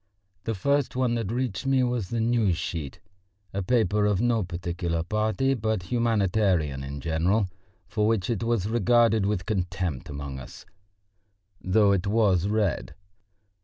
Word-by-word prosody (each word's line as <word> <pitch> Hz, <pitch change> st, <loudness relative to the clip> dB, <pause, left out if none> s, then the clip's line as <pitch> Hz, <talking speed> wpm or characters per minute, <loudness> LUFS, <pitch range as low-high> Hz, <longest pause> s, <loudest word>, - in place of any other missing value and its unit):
The 115 Hz, -, -1 dB
first 140 Hz, +7 st, 0 dB
one 125 Hz, -2 st, +1 dB
that 115 Hz, -4 st, -2 dB
reached 125 Hz, -1 st, -2 dB
me 135 Hz, -1 st, +3 dB
was 120 Hz, -6 st, -1 dB
the 115 Hz, -, -2 dB
News 110 Hz, -6 st, +2 dB
sheet, 80 Hz, -5 st, -5 dB, 0.5 s
a 100 Hz, -, -1 dB
paper 105 Hz, -1 st, +2 dB
of 100 Hz, -2 st, +1 dB
no 120 Hz, -1 st, +2 dB
particular 85 Hz, -2 st, -3 dB
party 110 Hz, +8 st, 0 dB
but 110 Hz, -5 st, -1 dB
humanitarian 95 Hz, -, +1 dB
in 70 Hz, +1 st, -6 dB
general, 85 Hz, +7 st, +1 dB, 0.4 s
for 105 Hz, -1 st, 0 dB
which 110 Hz, -5 st, +1 dB
it 115 Hz, -4 st, -1 dB
was 115 Hz, -4 st, 0 dB
regarded 115 Hz, -1 st, +3 dB
with 100 Hz, -3 st, -1 dB
contempt 90 Hz, -, -2 dB
among 70 Hz, -1 st, -6 dB
us, -, -, -11 dB, 1.0 s
though 100 Hz, +2 st, +4 dB
it 100 Hz, -1 st, +1 dB
was 100 Hz, -4 st, +2 dB
read. 105 Hz, -2 st, -1 dB
105 Hz, 145 wpm, -26 LUFS, 90-115 Hz, 1.0 s, though